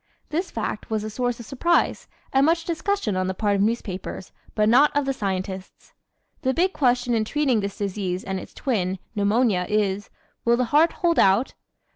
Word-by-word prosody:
This 345 +5 -2
fact 215 -1 -4
was 215 -1 -1
a 215 - -5
source 245 +1 -2
of 235 - -8
surprise 315 +8 +1 0.3
and 270 0 +4
much 330 +2 +2
discussion 345 - -1
on 185 0 0
the 190 - -2
part 205 0 +1
of 195 - +1
newspapers, 200 -4 -3 0.2
but 210 -1 +3
not 265 +6 +6
of 290 - +1
the 270 - 0
scientists. 190 -4 -5 0.5
The 260 -3 0
big 370 +3 +2
question 245 -2 +2
in 225 -1 +2
treating 265 0 +1
this 200 -1 -4
disease 190 -2 -3
and 190 -1 -3
its - - -12
twin, 190 -8 -1 0.2
Pneumonia, 205 -2 +2
is: 205 -1 0 0.3
will 235 0 +3
the 250 - +1
heart 320 +3 +5
hold 340 -2 +1
out? 195 +7 +3
225 Hz, 185 wpm, -24 LUFS, 195-270 Hz, 0.5 s, not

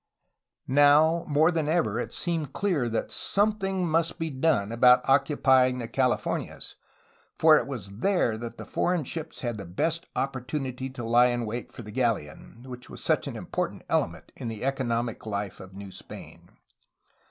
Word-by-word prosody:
Now, 145 +4 +5
more 155 +3 +4
than 160 -3 -1
ever, 155 -10 +1
it - - -4
seemed 160 -5 -2
clear 170 -12 0
that 115 - -2
something 195 -3 +1
must 165 +1 +1
be 165 -1 -3
done 130 -7 +1
about 125 +2 +5
occupying 135 -2 +4
the 120 -2 -4
Californias, 130 0 -1 0.6
for 160 -1 +7
it - - -5
was 100 -7 -7
there 175 - +2
that 115 +1 -7
the - - -8
foreign 175 -3 0
ships 155 +4 -6
had 120 -3 -3
the 100 - -6
best 160 - -1
opportunity 130 -1 -3
to 130 -2 -7
lie 120 +2 +5
in 120 -1 -1
wait 115 +3 -5
for 120 - -9
the 105 - -9
galleon, 115 - -2
which 125 -1 -9
was - - -9
such - - +1
an - - -5
important - - -4
element - - -1
in - - -6
the 110 -1 -5
economic 120 -4 -1
life 100 -2 -4
of 95 0 -12
New 100 -1 -8
Spain. - - -11
130 Hz, 165 wpm, -27 LUFS, 115-155 Hz, 0.6 s, for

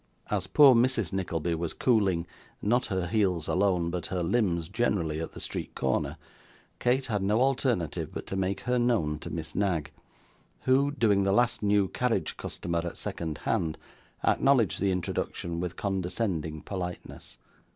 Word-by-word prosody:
As 95 -3 0
poor 140 +6 +7
Mrs. 115 -6 +2
Nickleby 85 -3 -1
was 80 0 -2
cooling 100 -9 +2 0.3
not 120 +5 +1
her 95 -4 -1
heels 90 -4 +1
alone, 90 -3 +1
but 90 -1 -3
her 90 -2 -2
limbs 85 -4 +1
generally 85 -7 0
at 80 - -5
the - - -9
street - - -5
corner, 65 -1 -1 0.6
Kate 125 +2 +2
had 105 -5 -1
no 105 +3 +2
alternative 125 - +1
but - - -6
to - - -4
make 95 +1 -1
her 125 0 +1
known 105 -12 +1
to - - -7
Miss 80 0 -4
Knag, 85 -7 0 0.7
who, 135 +2 +3
doing 115 -8 +2
the 95 0 +2
last 120 +3 +2
new 100 -1 +3
carriage 125 +4 -1
customer 85 -1 -3
at 85 - -5
second 80 -3 -4
hand, 85 -8 0 0.5
acknowledged 130 -7 +3
the 100 -1 +2
introduction 85 -1 -3
with 90 -1 -3
condescending 90 -5 -2
politeness. 90 -3 -6
95 Hz, 155 wpm, -28 LUFS, 85-115 Hz, 0.7 s, poor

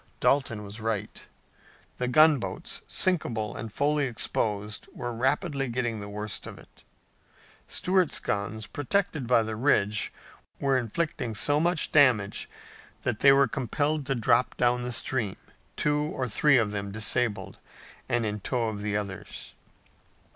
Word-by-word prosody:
Dalton 130 -6 +1
was 105 +2 -9
right. 110 -2 -3 0.7
The 125 - 0
gunboats, 155 +1 +3
sinkable 120 - 0
and 115 -2 -6
fully 145 +4 +1
exposed, 105 -3 -2
were 120 0 -5
rapidly 135 +3 0
getting 120 -2 -2
the 100 0 -7
worst 105 0 -5
of - - -9
it. - - -18 0.8
Stuart's 185 -3 +1
guns, 105 +1 -3
protected 150 -2 -1
by 120 -2 +4
the 110 0 -4
ridge, 105 -4 +1 0.5
were 135 -1 +2
inflicting 125 -1 -2
so 145 +7 +2
much 175 0 0
damage 125 -9 +3 0.5
that 115 -3 -1
they 140 - +7
were 135 0 +5
compelled 145 +4 -1
to 135 - +1
drop 120 +1 +2
down 125 0 +2
the 125 0 -3
stream, 120 -4 0 0.4
two 150 0 +1
or 140 -4 -2
three 140 +5 +4
of 110 -3 +1
them 100 -1 -4
disabled 110 +1 -1 0.5
and 120 -1 +1
in 105 0 -2
tow 115 +2 -1
of 105 -2 -5
the 105 0 -1
others. 100 -3 -6
120 Hz, 140 wpm, -27 LUFS, 105-140 Hz, 0.8 s, they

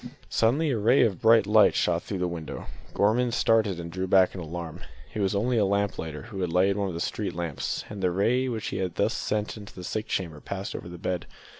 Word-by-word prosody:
Suddenly 140 +7 +2
a 115 - 0
ray 120 +6 +5
of 100 -6 0
bright 110 -2 +6
light 105 +1 +5
shot 85 -1 +1
through 100 - -5
the 90 0 0
window. 85 -2 -6 0.3
Gorman 120 +4 +3
started 110 -6 +2
and 85 0 -6
drew 95 +2 -3
back 95 0 +5
in 95 - -6
alarm. 85 0 -6 0.3
It - - -4
was 100 0 +1
only 115 +4 +1
a - - +4
lamp 100 0 0
lighter 80 -2 -5
who 110 -4 -6
had 90 -2 -1
lighted 95 +3 +3
one 100 -1 0
of 90 - -4
the - - -3
street 95 +1 -3
lamps, 85 -5 -3
and 105 -2 -7
the 90 - +3
ray 115 +8 +1
which 115 -3 -3
he - - -4
had 95 -3 -2
thus - - +1
sent 105 +1 -2
into 105 -1 -11
the 90 - -8
sick 110 +4 -3
chamber 85 -5 -3
passed 100 0 -5
over 85 - -6
the 85 - -8
bed. 90 0 -3
100 Hz, 245 wpm, -27 LUFS, 90-110 Hz, 0.3 s, bright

